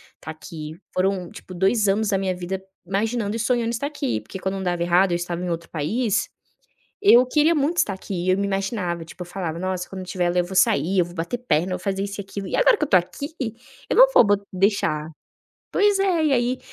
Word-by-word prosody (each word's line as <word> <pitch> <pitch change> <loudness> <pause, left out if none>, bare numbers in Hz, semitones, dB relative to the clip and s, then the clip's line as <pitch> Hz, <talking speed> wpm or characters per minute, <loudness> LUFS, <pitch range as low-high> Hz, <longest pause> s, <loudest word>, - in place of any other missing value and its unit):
estar 160 - -8
aqui. 155 +1 -9
Foram, 185 -1 0
tipo, 185 - -11
2 195 +4 +2
anos 210 +2 +1
da 195 - +2
minha 190 -1 -1
vida, 180 +2 -4 0.2
imaginando 210 +3 -1
e 230 - -3
sonhando 235 0 +1
estar 240 +5 -2
aqui, 120 - -2
porque 190 - -9
quando 190 +1 -2
não 190 - -4
dava 175 -1 -1
errado, 175 +2 +3
eu 175 - +2
estava 175 0 -3
em 180 - -2
outro 170 0 -4
país, 205 - -1 0.7
eu 250 - +7
queria 305 +5 +3
muito 300 +4 0
estar 200 - +2
aqui 185 -2 -5
e - - +3
eu 185 - +2
me 200 - 0
imaginava, 195 -4 -2
tipo, 180 +2 -10
eu - - -8
falava: 175 -3 -4
"Nossa, 185 0 -3
quando 190 - -7
eu 185 - -7
tiver 180 -1 0
lá, 180 - 0
eu 175 - +3
vou 190 +1 -6
sair, 185 0 +3
eu 175 - +3
vou 175 - -11
bater 170 +7 -3
perna, 185 -7 0
vou 180 - -2
fazer 195 +1 -2
isso 200 0 -6
e - - -4
aquilo". 195 0 -6
E - - -1
agora - - +5
que - - +1
eu - - -4
estou 190 -9 +6
aqui, 285 - -6 0.6
eu - - +1
não - - +9
vou - - +8
bo 205 - +4 0.2
deixar 180 -5 +1 0.6
Pois 410 -1 +3
é, 355 -5 +2
e 285 - +2
aí 245 0 +1
190 Hz, 245 wpm, -23 LUFS, 175-230 Hz, 0.7 s, não